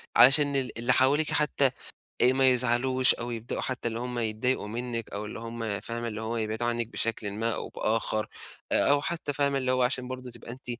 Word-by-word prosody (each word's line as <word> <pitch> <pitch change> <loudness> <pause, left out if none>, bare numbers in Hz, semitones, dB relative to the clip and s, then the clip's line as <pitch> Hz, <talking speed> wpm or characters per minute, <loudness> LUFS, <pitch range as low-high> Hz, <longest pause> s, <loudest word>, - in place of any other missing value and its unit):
علشان 140 +2 +6
ال 130 -4 -1
اللي 120 +2 +2
حواليكِ 145 +5 +3
حتّى 145 -3 +2 0.5
آآ 125 +1 +5
ما 135 0 +5
يزعلوش 125 +1 +4
أو 120 0 -5
يبدأوا 115 0 -4
حتّى 130 -2 -3
اللي 115 0 -3
هم 125 0 -4
يتضايقوا 110 +1 0
منِّك 115 +1 -4
أو 105 +1 -5
اللي 105 - -7
هم 115 -3 -4
فاهمة؟ 115 0 -5
اللي 110 -1 -5
هو 115 +1 -3
يبعدوا 110 +1 -2
عنِّك 120 -1 0
بشكل 115 -2 -2
ما 115 +3 0
أو - - -5
بآخَر 110 -1 -1 0.4
أ - - +3
أو 145 0 +4
حتّى 160 -2 -3
فاهمة، 140 -1 +1
اللي 130 -1 0
هو 130 0 +2
عشان 125 0 -1
برضه 130 -1 -7
تبقى 115 - -10
أنتِ 125 +2 -11
120 Hz, 205 wpm, -27 LUFS, 115-130 Hz, 0.5 s, علشان